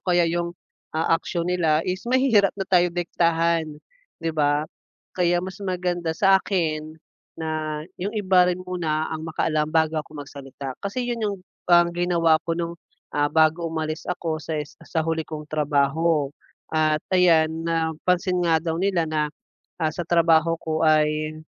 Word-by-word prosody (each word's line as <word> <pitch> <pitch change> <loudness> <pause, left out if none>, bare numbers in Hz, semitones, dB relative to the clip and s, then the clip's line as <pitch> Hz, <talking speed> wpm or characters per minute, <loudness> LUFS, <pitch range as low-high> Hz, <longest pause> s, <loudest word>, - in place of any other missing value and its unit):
kaya 175 -1 +4
yung, 170 +1 -2 0.4
ah, 160 - +1
action 170 -2 -3
nila 165 -3 +1
is 185 +5 -3
mahirap 240 -6 +4
na 195 - -2
tayo 180 -2 +3
diktahan, 170 -1 +1 0.5
'di 165 - 0
ba? 145 -1 +1 0.5
Kaya 175 -1 +1
mas 190 +2 -7
maganda 180 -3 -2
sa 195 +1 +5
akin, 155 -5 -2 0.4
na 155 -1 -3 0.2
yung 205 +4 -3
iba 185 -3 +4
rin 180 - 0
muna 160 -4 -2
ang 155 - -4
makaalam 155 -1 0
bago 160 -1 +1
ako 150 - -13
magsalita. 135 -1 -8
Kasi 200 +6 -3
'yon 240 -1 -3
yung 205 -2 -1 0.3
parang 175 0 +5
ginawa 170 -2 +2
ko 165 0 -1
nung, 170 -1 -2 0.4
ah, 145 0 +1
bago 160 +2 +3
umalis 155 -1 -3
ako 165 -2 -2
sa 155 +2 -4
is 150 -1 -5
sa 160 -1 -1
huli 160 0 0
kong 155 -1 -6
trabaho. 150 0 +1 0.4
At 155 -1 +2
ayan, 165 -4 +5 0.2
napansin 170 +3 0
nga 165 -1 +4
daw 165 0 -2
nila 185 -4 +1
na, 155 -1 0 0.5
ah, 155 -1 +1
sa 165 - -5
trabaho 165 -1 +4
ko 160 -1 -2
ay, 155 0 +2
165 Hz, 155 wpm, -24 LUFS, 155-180 Hz, 0.5 s, sa